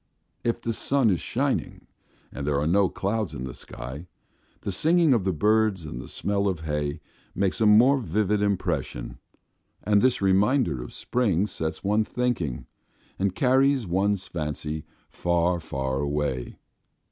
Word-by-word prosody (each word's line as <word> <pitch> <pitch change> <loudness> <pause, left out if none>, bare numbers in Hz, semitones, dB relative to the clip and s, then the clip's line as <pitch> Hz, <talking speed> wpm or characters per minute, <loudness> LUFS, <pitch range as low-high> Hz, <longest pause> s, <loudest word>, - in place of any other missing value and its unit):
If 115 0 0
the 115 -1 -2
sun 130 -1 +2
is 90 - +1
shining, - - -2 0.5
and 70 - -5
there 70 -1 +1
are 75 - 0
no 95 +3 +3
clouds 100 -5 -2
in 65 - -5
the 65 -2 -5
sky, 65 +9 -8 0.5
the 100 - -3
singing 160 - +4
of 110 -6 +1
the 95 - +2
birds 105 0 +2
and 60 -5 -6
the - - -10
smell 100 0 -1
of 90 -5 -1
hay 75 -1 -2 0.4
make 100 +2 0
a 110 - +4
more 125 +7 +6
vivid 105 0 0
impression, 85 -11 -2 0.6
and 105 0 +3
this 130 -1 +3
reminder 95 - +2
of - - -8
spring 105 -7 0
sets 80 -5 -4
one 105 +2 +2
thinking 110 - -2 0.5
and 95 -1 0
carries 130 +1 +3
one's 95 +2 0
fancy 75 -1 -4 0.3
far, 85 0 +1
far 65 -4 -3
away. 70 -3 -2
95 Hz, 150 wpm, -26 LUFS, 75-110 Hz, 0.6 s, more